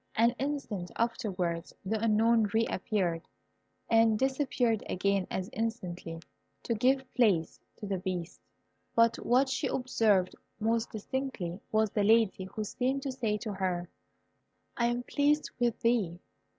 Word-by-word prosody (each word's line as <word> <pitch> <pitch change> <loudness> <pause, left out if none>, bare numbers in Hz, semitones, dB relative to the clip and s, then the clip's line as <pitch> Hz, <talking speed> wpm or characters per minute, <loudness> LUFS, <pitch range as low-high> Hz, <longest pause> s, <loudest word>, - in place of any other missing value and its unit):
An 230 +2 +4
instant 260 -10 -3
afterwards 185 -8 -2
the 220 +3 -1
Unknown 225 0 +4
re 225 +1 +4
appeared, 180 -5 -1 0.6
and 225 -1 +4
disappeared 260 -3 +1
again 195 0 +1
as 185 -1 -3
instantly, 180 -7 -4 0.4
to 235 - 0
give 265 +4 +2
place 195 -10 +2 0.2
to - - -7
the 195 -2 -2
Beast. 180 -2 -4 0.5
But 230 0 +4
what 255 +3 +3
she 260 +1 -1
observed 220 -8 +2 0.2
most 225 +1 +1
distinctly 215 -6 -4
was 215 -1 +2
the 205 - +1
Lady, 215 -3 +3
who 205 +3 -5
seemed 260 +5 -1
to 275 - -2
say 230 -5 -1
to 210 -1 -5
her, 180 -2 -2 0.9
"I 235 - +2
am 240 +1 -1
pleased 290 +3 +1
with 240 -2 +1
thee. 215 -8 +1
220 Hz, 140 wpm, -30 LUFS, 190-245 Hz, 0.9 s, An